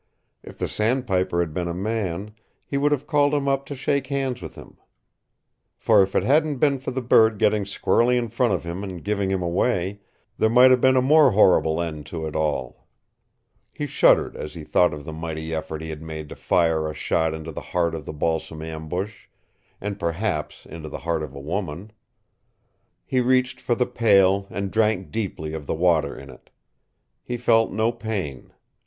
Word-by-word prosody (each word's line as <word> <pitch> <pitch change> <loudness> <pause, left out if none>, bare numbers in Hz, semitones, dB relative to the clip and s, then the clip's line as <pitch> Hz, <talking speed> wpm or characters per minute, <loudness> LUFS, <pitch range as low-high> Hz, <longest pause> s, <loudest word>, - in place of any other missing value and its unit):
If - - -12
the - - -2
sandpiper 105 -7 0
had 80 -3 -3
been 90 +2 -2
a 85 - -3
man, 100 -1 -3 0.3
he - - -5
would 145 +1 +2
have 145 -1 0
called 145 -1 +2
him 140 -1 -1
up 135 0 0
to 140 - -5
shake 140 0 -1
hands 135 -3 -2
with - - -8
him. - - -13 1.0
For - - +4
if 95 0 0
it - - +3
hadn't 150 +2 +2
been 140 0 +2
for 135 - -5
the 130 0 -3
bird 110 -2 +5
getting 105 0 +2
squarely 120 +4 +2
in 120 -1 -1
front 115 +1 +1
of - - -1
him 85 +3 -5
and 95 -4 -7
giving 100 -2 -1
him 95 -2 -1
away, 95 +2 0 0.4
there 110 - +3
might 125 +3 +7
have 125 -1 +4
been 130 0 +5
a 130 - +3
more 145 -2 +5
horrible 85 -6 +4
end 80 -3 -4
to 80 -2 -5
it 80 - -6
all. 75 -5 -2 0.8
He - - -4
shuddered - - +3
as 75 - -7
he 80 - -7
thought 90 +3 +3
of 75 -1 -8
the 80 - -6
mighty 80 0 -5
effort 80 0 -4
he 80 - -5
had 75 -1 -7
made 80 -2 -7
to - - -8
fire 80 -2 +1
a 75 - -7
shot 80 -1 0
into 80 +1 -7
the - - -7
heart 85 -2 -1
of 80 -3 -6
the - - -5
balsam 80 +1 -2
ambush 80 +6 -5 0.5
and 100 0 -5
perhaps 85 -2 -3
into 80 -2 -8
the - - -6
heart 85 -2 0
of 75 -2 -7
a - - -7
woman! 90 +5 -4 1.1
He 130 - +1
reached 130 +1 +1
for 120 - 0
the 125 - +1
pail 100 -4 +3
and 100 -1 -4
drank 110 -4 +1
deeply 95 -8 -4
of 75 -3 -6
the - - -1
water 85 -1 +1
in 70 -1 -10
it. 65 - -18 0.7
He 120 - -4
felt 115 -2 +3
no 110 +3 +1
pain. 105 - -5
95 Hz, 195 wpm, -23 LUFS, 80-120 Hz, 1.1 s, might